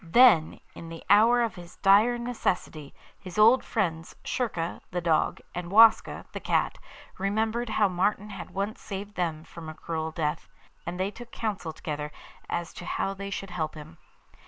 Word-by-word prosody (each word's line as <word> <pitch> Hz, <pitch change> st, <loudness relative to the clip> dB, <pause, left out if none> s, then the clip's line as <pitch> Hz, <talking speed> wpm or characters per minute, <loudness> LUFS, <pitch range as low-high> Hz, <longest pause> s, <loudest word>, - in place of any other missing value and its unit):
Then, 175 Hz, -3 st, +5 dB
in 165 Hz, -, -9 dB
the 165 Hz, 0 st, -9 dB
hour 230 Hz, +4 st, +6 dB
of 230 Hz, -, -1 dB
his 175 Hz, -1 st, -12 dB
dire 210 Hz, +5 st, +5 dB
necessity, 185 Hz, -, -2 dB, 0.3 s
his 185 Hz, 0 st, -9 dB
old 225 Hz, +5 st, +6 dB
friends 165 Hz, -7 st, -2 dB
Schurka 175 Hz, -9 st, -2 dB
(the 180 Hz, -, -2 dB
dog) 165 Hz, -3 st, +1 dB
and 175 Hz, -1 st, -5 dB
Waska 220 Hz, +2 st, +5 dB
(the -, -, -5 dB
cat) -, -, 0 dB, 0.4 s
remembered 220 Hz, +4 st, 0 dB
how 215 Hz, -1 st, +3 dB
Martin 200 Hz, +3 st, 0 dB
had 195 Hz, -3 st, -7 dB
once 195 Hz, +4 st, -3 dB
saved 200 Hz, +1 st, -6 dB
them 165 Hz, -4 st, -2 dB
from 165 Hz, -1 st, -10 dB
a 155 Hz, -, -8 dB
cruel 160 Hz, -1 st, -3 dB
death; 155 Hz, -1 st, -3 dB, 0.4 s
and 175 Hz, +1 st, -4 dB
they 190 Hz, +2 st, 0 dB
took 240 Hz, +2 st, -11 dB
counsel 205 Hz, -7 st, -3 dB
together 150 Hz, -1 st, -5 dB, 0.4 s
as 170 Hz, -1 st, -3 dB
to 175 Hz, -, -9 dB
how 195 Hz, -, -1 dB
they 200 Hz, 0 st, -6 dB
should 195 Hz, -1 st, -5 dB
help 160 Hz, -3 st, -3 dB
him. 155 Hz, +2 st, -11 dB
190 Hz, 170 wpm, -27 LUFS, 165-215 Hz, 0.4 s, hour